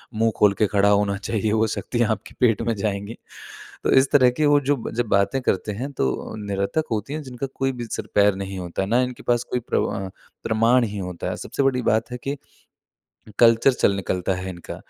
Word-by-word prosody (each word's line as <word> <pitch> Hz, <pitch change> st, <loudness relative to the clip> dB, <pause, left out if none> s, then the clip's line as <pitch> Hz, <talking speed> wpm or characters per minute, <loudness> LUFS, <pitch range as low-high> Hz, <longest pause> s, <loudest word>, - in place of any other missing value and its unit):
मुँह 115 Hz, +1 st, +2 dB
खोल 105 Hz, -1 st, +5 dB
के 105 Hz, -, +4 dB
खड़ा 100 Hz, 0 st, +3 dB
होना 100 Hz, -1 st, +2 dB
चाहिए, 110 Hz, +1 st, -2 dB
वो 110 Hz, 0 st, +2 dB
शक्तियाँ 120 Hz, +1 st, -1 dB
आपके 105 Hz, -1 st, -4 dB
पेट 115 Hz, -5 st, +3 dB
में 115 Hz, -, -1 dB
जाएँगी। 100 Hz, +1 st, -3 dB, 0.7 s
तो -, -, +1 dB
इस 130 Hz, 0 st, +5 dB
तरह 130 Hz, -3 st, +6 dB
की 150 Hz, +5 st, 0 dB
वो 145 Hz, 0 st, +5 dB
जो 145 Hz, -, +4 dB, 0.2 s
जब 120 Hz, 0 st, 0 dB
बातें 100 Hz, +7 st, +2 dB
करते 105 Hz, -2 st, -1 dB
हैं 135 Hz, +5 st, -4 dB
तो 65 Hz, -, -2 dB
निरर्थक 100 Hz, +10 st, -1 dB
होती 110 Hz, +6 st, -2 dB
हैं, 155 Hz, -, -3 dB
जिनका 130 Hz, +1 st, -5 dB
कोई 135 Hz, 0 st, 0 dB
भी 120 Hz, -, -3 dB
सिर-पैर 100 Hz, -1 st, +2 dB
नहीं 95 Hz, -1 st, -5 dB
होता 90 Hz, +1 st, -4 dB
है 95 Hz, -, -3 dB
ना, 120 Hz, +3 st, +3 dB
इनके 125 Hz, -1 st, -4 dB
पास 120 Hz, 0 st, +1 dB
कोई 125 Hz, -, +1 dB
प्रम -, -, +1 dB, 0.2 s
अ, -, -, -8 dB, 0.3 s
प्रमाण 115 Hz, +3 st, +3 dB
ही 105 Hz, -1 st, -5 dB
होता 90 Hz, -2 st, -4 dB
है। -, -, -3 dB
सबसे 140 Hz, -, -3 dB
बड़ी 130 Hz, -2 st, +2 dB
बात 110 Hz, +1 st, 0 dB
है 125 Hz, -, -4 dB
कि 140 Hz, +1 st, -2 dB, 1.0 s
कल्चर 115 Hz, +2 st, +6 dB
चल 100 Hz, -, +2 dB
निकलता 95 Hz, -1 st, -1 dB
है 95 Hz, +1 st, -5 dB
इनका, 85 Hz, -2 st, -8 dB
110 Hz, 215 wpm, -23 LUFS, 100-125 Hz, 1.0 s, तरह